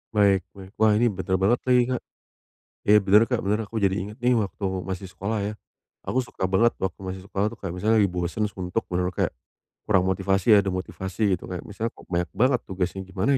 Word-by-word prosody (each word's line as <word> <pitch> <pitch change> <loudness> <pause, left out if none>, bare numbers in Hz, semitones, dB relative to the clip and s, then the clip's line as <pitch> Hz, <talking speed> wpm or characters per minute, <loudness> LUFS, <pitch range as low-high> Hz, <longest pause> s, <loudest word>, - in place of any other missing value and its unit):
Baik 100 -2 +5 0.2
baik. 95 -1 -11
Wah 110 -1 +5
ini 120 +2 +3
bener 95 -1 -1
banget 100 +6 +2
lagi, 125 -1 +5
Kak. 125 - -1 0.8
Iya 105 +1 +7
bener, 100 +2 +6
Kak, 125 -1 -1
bener, 105 +2 0
aku 110 +3 -6
jadi 95 -1 +2
inget 100 +3 -5
nih 125 0 +3
waktu 100 -1 -2 0.2
masih 95 0 -5
sekolah 100 +4 -3
ya 105 +1 -2 0.5
aku 130 - 0
suka 125 -6 -5
banget 115 +5 +3
waktu 95 -3 -2
masih 95 -1 -6
sekolah 100 +1 -1
tuh 110 - -6
kayak 95 -5 -6
misal 110 +3 +3
lagi 100 -4 +3
bosen 90 +4 -2
suntuk 95 +4 -3
bener-bener 90 0 -1
kayak, - - 0 0.6
kurang 95 -4 +4
motivasi 95 +2 +1
nggak 105 -2 +8
ada - - +1
motivasi 95 +1 -5
gitu - - -11
kayak 90 -1 -5
misal, 110 +2 -4
"Kok - - -16
banyak 85 0 0
banget 125 +4 +3
tugasnya 95 0 -2
gimana 95 +9 +1
100 Hz, 210 wpm, -25 LUFS, 95-110 Hz, 0.8 s, nggak